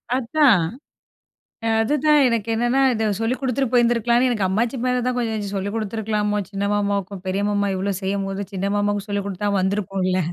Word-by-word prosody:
அதான்! 250 - +3 1.2
அதுதான், 295 +5 +3
எனக்கு 230 -2 -1
என்னான்னா, 240 +4 +1
இத 220 0 -1 0.2
சொல்லிக் 240 +3 -1
கொடுத்துட்டு 265 -1 -1
போயிருந்துருக்கலாம்ன்னு, 240 +1 +3
எனக்கு 210 -6 0
அம்மாச்சி 225 +7 0
மேல 250 0 +1
தான் 255 - 0
கொஞ்சம் 225 -2 -1
இத 205 -1 -4
சொல்லிக் 200 +2 -3
கொடுத்துருக்கலாமோ! 210 -1 -1
சின்ன 200 0 -2
மாமாவுக்கும். 200 -2 -2
பெரிய 195 +2 0
மாமா 205 0 +1
இவ்வளோ 195 +1 -1
செய்யும்போது, 195 +1 -2
சின்ன 195 +1 -1
மாமாவுக்கு 205 0 -1
சொல்லிக் 200 -1 -2
குடுத்தா 200 +2 -3
வந்திருப்போம்ல. 190 -1 0
210 Hz, 155 wpm, -22 LUFS, 200-240 Hz, 1.2 s, அதான்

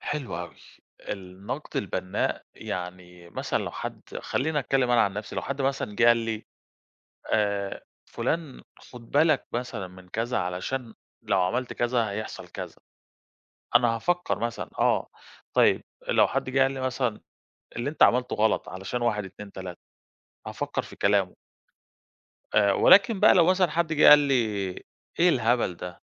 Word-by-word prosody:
حلو 140 - -4
أوي، 90 0 -7 0.5
النقد 100 +8 -6
البنّاء 95 -1 -2
يعني 90 -1 -7
مثلًا - - -2
لو - - -4
حد - - -6 0.2
خلّيني 150 +3 -1
أتكلم 130 -1 +1
أنا 120 - +5
عن 100 - 0
نفسي 105 +1 -6
لو - - -1
حد 140 +1 -3
مثلًا 135 -6 -1
جِا 120 0 +6
لي 115 -2 -3 0.9
آآ، 100 -2 0 0.2
فلان 160 -5 -3 0.2
خد 120 -2 -14
بالك 150 0 +3
مثلًا 120 -5 -4
من 90 0 -15
كذا 115 +5 -1
علشان 105 +7 -3 0.3
لو 95 - +1
عملت 120 +8 -1
كذا 120 -3 0
هيحصل 110 +2 -6
كذا، - - -8 1.0
أنا 120 0 +6
هافكّر 175 +9 -1
مثلًا، 115 0 -3
آه - - +2 0.4
طيّب، - - +4 0.2
لو - - +4
حد - - -2
جِه 135 +1 +2
قال 135 0 +4
لي 135 -1 -5
مثلًا 125 -4 -1 0.6
اللي 120 +5 -2
أنت 155 - 0
عملتُه 125 +1 +4
غلط 110 0 +1
علشان 95 +6 -4
1 105 -4 0
2 100 +1 -10
3 95 -2 -8 0.7
هافكّر - - -3
في - - -12
كلامُه. 100 -2 +1 1.2
آآ 100 -2 +5
ولكن 200 - +6
بقى - - +7
لو 170 -2 +5
مثلًا 185 -2 +3
حد 165 0 0
جِه 155 - +6
قال 150 - +11
لي 140 -2 +1 0.8
إيه 175 +1 +5
الهبل 120 - +2
ده، 90 0 -8
120 Hz, 150 wpm, -26 LUFS, 100-135 Hz, 1.2 s, قال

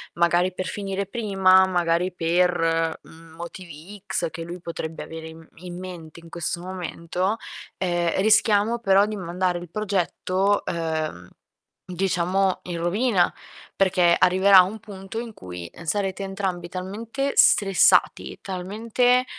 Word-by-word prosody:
magari, 175 +2 +2
per 185 0 -4
finire 195 -1 -4
prima, 195 -4 +4
magari 175 0 0
per 165 -1 +1
motivi 170 +3 -11
X" 170 -2 -1
che 165 +1 -6
lui 175 +1 -8
potrebbe 165 -2 -6
avere 160 0 -8
in 160 0 -12
in 175 +1 -9
mente 170 -3 -9
in 165 - -15
questo 170 +1 -3
momento, 185 +2 -3 0.4
ehm: 175 0 0
"Rischiamo 215 +2 +3
però 195 -2 +4
di 215 -1 -4
mandare 180 0 -1
il 175 - -10
progetto, 195 0 0
uhm, 155 - -3 0.6
diciamo, 185 +1 0
in 175 -2 -5
rovina." 190 +2 +1 0.4
Perché 180 -3 +3
arriverà 190 +1 +6
un 205 +4 -3
punto 200 0 -8
in 230 -2 -7
cui 90 - -9
sarete 195 +2 -2
entrambi 190 -3 -4
talmente 220 +10 -4
stressati, 195 -3 +4
talmente, 225 +7 0
185 Hz, 125 wpm, -24 LUFS, 170-195 Hz, 0.6 s, arriverà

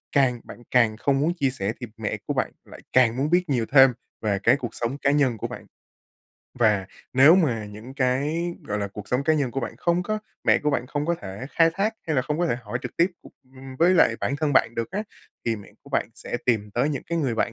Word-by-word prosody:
càng 130 -4 +3
bạn 120 - -12
càng 115 -3 +3
không 135 +2 +1
muốn 160 +5 +1
chia 140 -6 0
sẻ 110 -4 -3
thì 120 - -6
mẹ 110 -2 -3
của - - 0
bạn - - -1
lại - - -13
càng 125 -2 +4
muốn 145 +3 0
biết 175 -1 +2
nhiều 120 -4 +1
thêm 135 -2 +7 0.3
về 100 -3 0
cái 125 +4 +5
cuộc 120 -5 -6
sống 120 +4 -2
cá 140 -1 +2
nhân 135 -6 +2
của - - -3
bạn. - - -9 0.9
Và 105 -5 +3 0.3
nếu 140 +6 +7
mà 125 - +1
những 110 +6 -10
cái, 145 +6 0
gọi 105 0 -2
là, 100 - -2
cuộc 100 0 -9
sống 130 +3 0
cá 155 - +3
nhân 140 -5 0
của 135 - -3
bạn - - -5
không 170 +1 +1
có 215 +4 -2 0.3
mẹ - - +5
của 150 - 0
bạn 125 -3 -1
không 145 +2 -3
có 170 - +2
thể 100 +6 -6
khai 165 0 +4
thác, 210 +3 0
hay 155 -3 0
là 130 - +3
không 150 +3 -2
có 175 - +2
thể 120 - 0
hỏi 110 +3 -4
trực - - -7
tiếp, 170 - +5 0.5
ưm, 130 0 -10
với 175 +3 +5
lại 115 -9 +4
bản 140 - -1
thân 150 -1 0
bạn 115 -3 +3
được 115 - -3
á, 200 +3 -2 0.4
thì 115 -1 +1
mẹ 100 - -13
của - - -16
bạn - - 0
sẽ - - -5
tìm 110 -4 +1
tới 120 +7 +1
những 140 -4 -3
cái 170 0 -1
người 130 -7 0
bạn 115 - 0
130 Hz, 255 wpm, -24 LUFS, 115-150 Hz, 0.9 s, thêm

